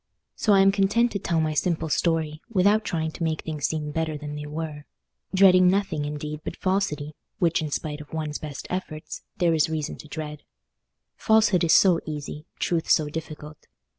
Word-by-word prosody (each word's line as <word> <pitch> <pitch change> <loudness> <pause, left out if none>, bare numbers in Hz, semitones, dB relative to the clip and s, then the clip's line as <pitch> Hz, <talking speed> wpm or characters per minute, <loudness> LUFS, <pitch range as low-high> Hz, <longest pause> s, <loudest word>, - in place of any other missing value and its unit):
So 210 - +2
I 195 - +6
am 195 0 +6
content 205 +5 +2
to 200 - -2
tell 170 -3 0
my 155 -1 0
simple 160 +1 0
story, 160 -1 0
without 210 +1 +3
trying 160 -5 -2
to 165 - -6
make 160 -1 -1
things 155 -3 -2
seem 150 -2 -3
better 160 0 -2
than 150 0 -6
they 150 0 -6
were; 150 -1 -5 0.5
dreading 185 -2 +6
nothing, 185 -6 +1
indeed, 150 +1 -5
but - - -5
falsity, 185 -6 -1 0.2
which, 170 -1 +2
in 155 - -3
spite 150 0 -3
of 150 - -13
one's 155 -2 -3
best 145 -3 -7
efforts, 170 -4 -5 0.2
there 170 -2 +3
is 155 -1 +2
reason 155 -2 -3
to - - -12
dread. 150 -1 -6 0.8
Falsehood 220 -5 +3
is 165 - +4
so 180 -4 +6
easy, 150 0 -6
truth 165 -2 -1
so 150 -1 +3
difficult. 155 -1 -8
160 Hz, 185 wpm, -25 LUFS, 150-185 Hz, 0.8 s, I